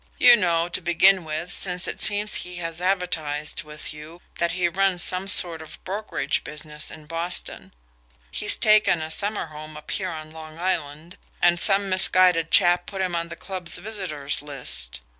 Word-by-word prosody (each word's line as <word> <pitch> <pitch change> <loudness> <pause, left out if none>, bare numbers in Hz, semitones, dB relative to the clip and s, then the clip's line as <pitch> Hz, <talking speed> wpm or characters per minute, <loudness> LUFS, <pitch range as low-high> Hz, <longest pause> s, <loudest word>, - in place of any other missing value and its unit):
You 245 - +7
know, 170 -5 0
to 175 - -4
begin 180 +2 +3
with, 155 +3 -5
since 180 -2 -2
it - - -5
seems 210 0 +6
he 180 0 -8
has 165 -1 -6
advertised 160 -5 -2
with 150 0 -7
you, 155 +3 -12 0.2
that 170 -1 0
he 180 -1 0
runs 185 0 0
some 185 +1 -1
sort 170 -4 +4
of 160 - -11
brokerage 205 +3 -3
business 150 0 -6
in 155 -1 -12
Boston. 170 +2 -3 0.6
He's - - +3
taken 215 -5 +3
a 160 - -7
summer 205 +3 -2
home 155 -1 -11
up 150 - -10
here 190 -2 -2
on 155 -2 -8
Long 160 0 -11
Island, 165 -2 -4 0.2
and 175 0 +3
some 200 0 +3
misguided 185 -3 +3
chap 175 0 +3
put 195 -2 -4
him 180 -2 -2
on 170 0 -3
the 170 - -8
club's 185 -1 -4
visitor's 185 -11 -4
list. 65 - -5
170 Hz, 175 wpm, -23 LUFS, 155-185 Hz, 0.6 s, You